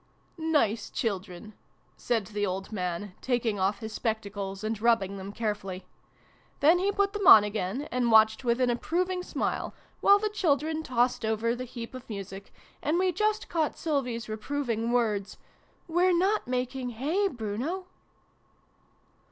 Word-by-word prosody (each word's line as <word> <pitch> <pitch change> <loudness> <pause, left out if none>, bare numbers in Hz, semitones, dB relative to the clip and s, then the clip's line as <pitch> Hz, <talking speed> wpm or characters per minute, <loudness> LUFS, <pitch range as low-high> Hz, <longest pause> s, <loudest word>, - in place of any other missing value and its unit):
" - - -38 0.2
Nice 220 -1 -1
children! 200 -2 -4 0.2
" - - -39
said 230 -4 -1
the 205 +1 -3
old 195 +1 -2
man, 180 -1 -3
taking 235 -5 0
off 195 +3 0
his 220 -1 -6
spectacles 200 -3 -3
and 215 -1 -2
rubbing 220 -4 +2
them 195 +1 -7
carefully. 200 -4 -4 0.7
Then 320 +5 +5
he 395 +2 +1
put 400 0 +1
them 410 -3 -1
on 215 - +11
again, 210 +6 -3
and 245 -1 +1
watched 220 +2 +5
with 235 0 +1
an 250 -1 +3
approving 360 +9 -1
smile, - - -3 0.2
while 400 - +6
the 425 +1 -1
children 315 -5 +1
tossed 245 -5 +1
over 220 +2 0
the 250 +1 -5
heap 235 -1 -8
of 255 -1 -10
music, 195 -1 -7 0.3
and 305 +4 +1
we 370 0 +2
just 425 +3 0
caught 320 -3 -1
Sylvie's 250 -7 -2
reproving 230 0 -2
words, 215 -5 0 0.2
" - - -36
We're 350 +1 +3
not 390 - +1
making 250 0 -2
hay, 335 - +1
Bruno 255 - -4
235 Hz, 155 wpm, -28 LUFS, 210-305 Hz, 0.7 s, on